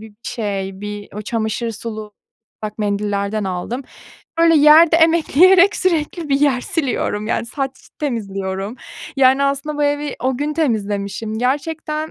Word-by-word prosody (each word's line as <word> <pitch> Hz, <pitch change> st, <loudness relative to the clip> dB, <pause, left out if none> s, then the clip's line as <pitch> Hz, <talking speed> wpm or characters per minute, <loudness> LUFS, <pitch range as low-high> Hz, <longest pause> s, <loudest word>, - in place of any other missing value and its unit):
bir 205 Hz, -, -27 dB
şey, 195 Hz, -5 st, -4 dB
bir 205 Hz, 0 st, -6 dB
o 210 Hz, -, -5 dB
çamaşır 225 Hz, +1 st, -2 dB
sulu 215 Hz, -1 st, -7 dB, 0.5 s
ıslak 215 Hz, 0 st, -6 dB
mendillerden 205 Hz, 0 st, -1 dB
aldım. 190 Hz, +8 st, -4 dB, 0.6 s
Böyle 330 Hz, 0 st, +5 dB
yerde 310 Hz, +3 st, +7 dB
emekleyerek 340 Hz, +4 st, +5 dB
sürekli 330 Hz, -2 st, -1 dB
bir 275 Hz, 0 st, +2 dB
yer 275 Hz, -4 st, +3 dB
siliyorum, 245 Hz, -9 st, -2 dB
yani, 230 Hz, -, -1 dB
saç 270 Hz, +2 st, -3 dB, 0.3 s
temizliyorum. 195 Hz, -5 st, -3 dB, 0.4 s
Yani, 265 Hz, +1 st, +4 dB
aslında 280 Hz, +2 st, -1 dB
bu 295 Hz, -, +2 dB
evi 290 Hz, 0 st, -1 dB
o 260 Hz, 0 st, 0 dB
gün 295 Hz, +3 st, -2 dB
temizlemişim. 215 Hz, -6 st, -2 dB
Gerçekten, 305 Hz, +4 st, -2 dB
250 Hz, 135 wpm, -19 LUFS, 210-300 Hz, 0.6 s, yerde